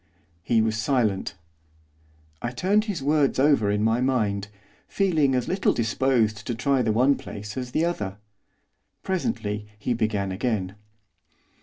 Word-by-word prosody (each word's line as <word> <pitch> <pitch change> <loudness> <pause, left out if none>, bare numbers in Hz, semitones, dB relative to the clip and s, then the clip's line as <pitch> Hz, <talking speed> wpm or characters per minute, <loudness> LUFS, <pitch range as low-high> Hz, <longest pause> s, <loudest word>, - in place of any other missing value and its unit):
He 110 +4 +2
was 110 -1 0
silent. 110 -9 0 1.1
I 120 - -2
turned 195 - +1
his 195 -10 -3
words 145 -1 +2
over 135 -6 +3
in 105 +1 +1
my 115 +2 +2
mind, 105 -7 0 0.4
feeling 160 -9 +2
as 125 - -1
little 190 +1 +1
disposed 110 -2 +1
to 120 - -1
try 135 +3 +1
the 115 -2 +1
one 125 +6 +4
place 105 -5 -7
as 125 -1 -4
the 155 +6 +1
other. 105 - -3 0.9
Presently 110 - -2
he 115 +4 -1
began 105 -4 -1
again. 95 -2 -2
120 Hz, 140 wpm, -25 LUFS, 105-140 Hz, 1.1 s, one